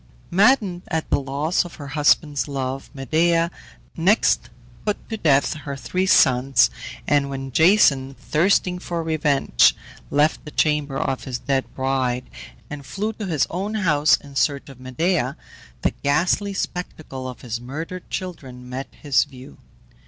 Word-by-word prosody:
Maddened 195 Hz, -2 st, +3 dB
at 160 Hz, -2 st, -3 dB
the -, -, +3 dB
loss 140 Hz, +5 st, 0 dB
of 175 Hz, -, -10 dB
her 145 Hz, -2 st, -9 dB
husband's 145 Hz, -2 st, +2 dB
love 135 Hz, -1 st, -4 dB
Medea 165 Hz, +5 st, +2 dB, 0.4 s
next 190 Hz, +7 st, +2 dB, 0.3 s
put 210 Hz, -1 st, 0 dB
to 225 Hz, -, -2 dB
death 140 Hz, -7 st, +3 dB
her 145 Hz, -2 st, -6 dB
three 185 Hz, +7 st, -2 dB
sons, 130 Hz, -, +4 dB, 0.4 s
and 140 Hz, -1 st, +2 dB
when 135 Hz, -1 st, -5 dB
Jason, 140 Hz, -, +4 dB
thirsting 180 Hz, +4 st, +1 dB
for 170 Hz, -2 st, -3 dB
revenge, 150 Hz, -3 st, +3 dB, 0.3 s
left 150 Hz, +2 st, +2 dB
the 150 Hz, -, -8 dB
chamber 150 Hz, -2 st, 0 dB
of 135 Hz, -1 st, -2 dB
his 130 Hz, -3 st, -3 dB
dead 135 Hz, +1 st, -1 dB
bride, 130 Hz, -2 st, -1 dB, 0.4 s
and 150 Hz, -1 st, -7 dB
flew 210 Hz, +9 st, -3 dB
to 210 Hz, -2 st, -6 dB
his 155 Hz, -6 st, +1 dB
own 195 Hz, +5 st, -3 dB
house 155 Hz, -7 st, +3 dB
in 140 Hz, -1 st, -14 dB
search 140 Hz, 0 st, 0 dB
of 135 Hz, -2 st, -13 dB
Medea, 130 Hz, +1 st, -1 dB, 0.5 s
the -, -, +3 dB
ghastly 180 Hz, +7 st, +1 dB
spectacle 155 Hz, -9 st, -5 dB
of 125 Hz, -, -10 dB
his 120 Hz, -1 st, -5 dB
murdered 160 Hz, +8 st, -7 dB
children 135 Hz, -9 st, -6 dB
met 130 Hz, +2 st, -5 dB, 0.2 s
his 145 Hz, -3 st, +3 dB
view. 130 Hz, -2 st, -14 dB
145 Hz, 145 wpm, -22 LUFS, 135-175 Hz, 0.5 s, sons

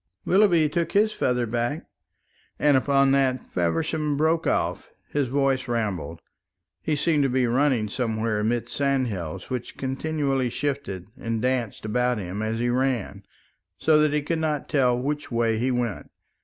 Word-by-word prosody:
"Willoughby 180 Hz, -5 st, +4 dB
took 170 Hz, +3 st, -2 dB
his 215 Hz, +2 st, +3 dB
feather 125 Hz, -7 st, 0 dB
back" 120 Hz, +6 st, -2 dB, 0.7 s
and 145 Hz, -1 st, +4 dB
upon 135 Hz, +1 st, +3 dB
that 135 Hz, -2 st, +2 dB
Feversham 150 Hz, -, 0 dB
broke 160 Hz, +2 st, +1 dB
off. -, -, -1 dB, 0.2 s
His 145 Hz, -2 st, 0 dB
voice 135 Hz, 0 st, +1 dB
rambled. 100 Hz, -8 st, -3 dB, 0.6 s
He 155 Hz, -, 0 dB
seemed 150 Hz, 0 st, +2 dB
to 135 Hz, -, +2 dB
be 130 Hz, 0 st, +2 dB
running 125 Hz, -2 st, +2 dB
somewhere 110 Hz, -1 st, -1 dB
amid 115 Hz, +2 st, 0 dB
sandhills 115 Hz, -, -2 dB
which 125 Hz, -2 st, -4 dB
continually 135 Hz, -1 st, -1 dB
shifted 130 Hz, -9 st, -3 dB
and 115 Hz, -1 st, -2 dB
danced 125 Hz, -3 st, -1 dB
about 125 Hz, +2 st, +1 dB
him 95 Hz, +1 st, -4 dB
as 110 Hz, +1 st, -1 dB
he 120 Hz, +1 st, 0 dB
ran, 125 Hz, -3 st, -1 dB, 0.6 s
so 155 Hz, -1 st, +4 dB
that 150 Hz, -1 st, +3 dB
he 150 Hz, 0 st, 0 dB
could 165 Hz, +2 st, -1 dB
not 155 Hz, -3 st, -1 dB
tell 125 Hz, -4 st, +2 dB
which 145 Hz, +3 st, -3 dB
way 115 Hz, -1 st, +1 dB
he 125 Hz, +3 st, +1 dB
went. 120 Hz, -5 st, -2 dB
130 Hz, 155 wpm, -25 LUFS, 115-145 Hz, 0.7 s, Willoughby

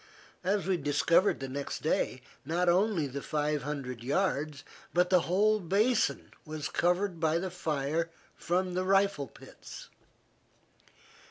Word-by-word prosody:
As 195 Hz, +2 st, +1 dB
we 190 Hz, -1 st, +1 dB
discovered 160 Hz, +6 st, +2 dB
the 135 Hz, -, -4 dB
next 140 Hz, +2 st, -5 dB
day, 130 Hz, -4 st, 0 dB, 0.2 s
not 170 Hz, +5 st, 0 dB
only 185 Hz, -1 st, +3 dB
the 140 Hz, +1 st, -5 dB
five 150 Hz, 0 st, -1 dB
hundred 130 Hz, -4 st, -5 dB
yards, 145 Hz, -1 st, -1 dB, 0.3 s
but 180 Hz, +1 st, +3 dB
the 180 Hz, -, +6 dB
whole 215 Hz, +4 st, +3 dB
basin 210 Hz, +6 st, +1 dB
was 155 Hz, -1 st, -5 dB
covered 180 Hz, 0 st, +1 dB
by 160 Hz, 0 st, +2 dB
the 185 Hz, +1 st, -3 dB
fire 160 Hz, -1 st, -1 dB, 0.3 s
from 180 Hz, +1 st, -1 dB
the 185 Hz, +1 st, 0 dB
rifle 195 Hz, -6 st, +2 dB
pits. -, -, -12 dB
170 Hz, 135 wpm, -30 LUFS, 145-185 Hz, 0.3 s, the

